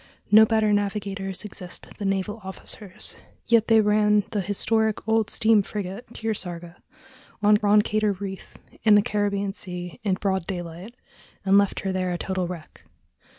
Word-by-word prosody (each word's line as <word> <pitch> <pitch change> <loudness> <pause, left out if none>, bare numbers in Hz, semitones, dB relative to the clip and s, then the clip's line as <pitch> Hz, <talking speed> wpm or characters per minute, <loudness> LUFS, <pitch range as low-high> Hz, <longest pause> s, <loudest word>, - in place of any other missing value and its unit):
No 220 +1 +8
better 220 -2 +2
navigators 200 -2 -2
exist 180 -3 -7
than 200 -2 0
naval 195 +3 -2
officers, 190 +1 -6 0.3
yet 230 -2 +3
they 225 -1 +6
ran 210 0 +3
the 210 - 0
historic 220 +3 0
old 220 -1 +2
steam 220 -2 +4
frigate 200 +2 -6
Kearsarge 175 -6 -3 0.7
on 210 0 +6
Roncador 210 0 +2
Reef, 195 -1 -7 0.3
in 215 -2 +6
the 205 - +5
Caribbean 200 -1 -1
Sea, 180 -1 -5
in 200 -3 +1
broad 190 -3 -1
daylight, 175 +4 -6 0.5
and 195 0 +4
left 200 -1 0
her 195 - -2
there 185 -1 -1
a 175 - -2
total 185 0 -2
wreck. 170 -3 -9
200 Hz, 150 wpm, -25 LUFS, 190-215 Hz, 0.7 s, No